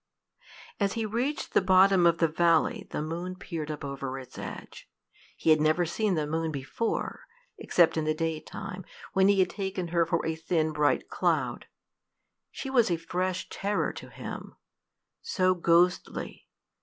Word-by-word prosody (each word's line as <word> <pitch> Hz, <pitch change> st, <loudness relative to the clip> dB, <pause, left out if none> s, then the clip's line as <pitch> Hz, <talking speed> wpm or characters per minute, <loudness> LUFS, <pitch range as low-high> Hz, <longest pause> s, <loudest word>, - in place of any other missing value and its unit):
As 200 Hz, -2 st, +1 dB
he 225 Hz, -2 st, -2 dB
reached 245 Hz, +8 st, -2 dB
the -, -, +5 dB
bottom 190 Hz, -1 st, +5 dB
of 170 Hz, 0 st, +3 dB
the 165 Hz, -, +3 dB
valley, 170 Hz, +6 st, +2 dB
the -, -, -3 dB
moon 170 Hz, +4 st, -4 dB
peered 165 Hz, -5 st, -6 dB
up 150 Hz, -2 st, -5 dB
over 135 Hz, -1 st, -4 dB
its 130 Hz, -2 st, -10 dB
edge. -, -, -8 dB, 0.5 s
He 160 Hz, -, +3 dB
had 155 Hz, -1 st, +5 dB
never 155 Hz, +3 st, +3 dB
seen 200 Hz, +3 st, 0 dB
the 155 Hz, -2 st, 0 dB
moon 160 Hz, +1 st, -1 dB
before 145 Hz, +11 st, -3 dB, 0.3 s
except 170 Hz, -2 st, +3 dB
in 155 Hz, -, 0 dB
the 155 Hz, 0 st, +1 dB
daytime, 165 Hz, +3 st, -4 dB, 0.3 s
when 190 Hz, 0 st, +4 dB
he 200 Hz, 0 st, +4 dB
had 180 Hz, -, +1 dB
taken 190 Hz, -3 st, -3 dB
her 170 Hz, -1 st, +2 dB
for 170 Hz, 0 st, 0 dB
a 160 Hz, -, 0 dB
thin 160 Hz, -1 st, 0 dB
bright 150 Hz, -1 st, +1 dB
cloud. -, -, -1 dB, 0.8 s
She -, -, -7 dB
was 240 Hz, -6 st, +4 dB
a 170 Hz, -, +1 dB
fresh 180 Hz, +2 st, -2 dB
terror 205 Hz, +1 st, -1 dB
to -, -, -9 dB
him -, -, -8 dB, 0.7 s
so 185 Hz, -1 st, +2 dB
ghostly! 175 Hz, +1 st, +1 dB
170 Hz, 160 wpm, -28 LUFS, 155-190 Hz, 0.8 s, the